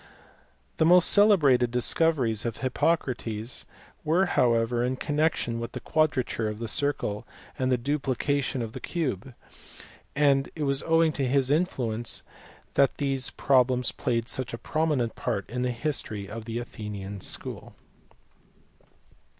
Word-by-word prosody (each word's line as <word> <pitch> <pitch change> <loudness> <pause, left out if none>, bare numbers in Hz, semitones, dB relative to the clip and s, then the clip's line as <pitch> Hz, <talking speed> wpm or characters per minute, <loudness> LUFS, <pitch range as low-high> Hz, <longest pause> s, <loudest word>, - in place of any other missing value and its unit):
The 160 - +3
most 180 0 +7
celebrated 150 - +5
discoveries 125 -2 +2
of 115 -1 -3
Hippocrates 130 -5 -2 0.4
were 170 +5 +3
how 125 -9 +3
ever 115 +1 0
in 125 +1 0
connection 145 -5 -1
with 115 +1 -6
the - - -5
quadrature 130 -8 0
of 105 - -5
the 115 +1 -5
circle 115 -6 -1 0.4
and 130 0 +1
the 125 - +3
duplication 135 0 -1
of 110 - -6
the - - -6
cube, 130 - -3 0.8
and 140 -1 +3
it 155 - -3
was 140 0 +1
owing 165 0 +3
to 135 -3 -1
his 135 +1 +2
influence 125 -9 -1 0.5
that 140 -1 +3
these 135 -2 0
problems 125 -2 +2
played 115 -2 -2
such 130 -2 -3
a - - -8
prominent 150 -5 -1
part 100 - -3
in 125 +1 -2
the 125 - 0
history 115 -6 -3
of 110 +3 -7
the 115 0 -4
Athenian 100 -4 -6
school. - - -5
130 Hz, 140 wpm, -27 LUFS, 115-145 Hz, 0.8 s, most